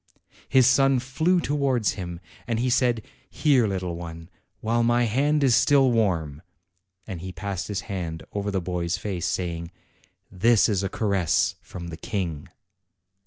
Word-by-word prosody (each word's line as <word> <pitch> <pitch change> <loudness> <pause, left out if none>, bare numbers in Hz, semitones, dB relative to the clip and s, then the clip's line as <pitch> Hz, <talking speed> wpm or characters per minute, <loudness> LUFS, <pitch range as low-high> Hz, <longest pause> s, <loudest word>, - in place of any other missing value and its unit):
His 130 -2 +5
son 135 +1 +4
flew 155 +8 +1
towards 140 -8 +1
him, 85 -3 -6 0.3
and 115 -2 0
he 125 +2 0
said, 120 -3 +2 0.3
"Here, 135 -7 +3
little 90 -3 -3
one, 85 -1 -8 0.3
while 115 +2 0
my 120 +1 +3
hand 140 +6 +2
is 130 -3 +4
still 135 -1 +4
warm!" 85 -10 0 0.6
and 95 -6 -6
he 95 +1 -6
passed 95 0 -4
his 100 -3 -3
hand 85 -6 -5
over 100 0 -2
the 95 -2 -1
boy's 90 0 -2
face, 90 -4 -3
saying, 85 -2 -3 0.6
"This 110 +4 +4
is 100 -4 +1
a 95 - -2
caress 95 -7 +1
from 85 -2 -8
the 80 - -7
King." 85 -10 -4
100 Hz, 155 wpm, -25 LUFS, 85-120 Hz, 0.6 s, His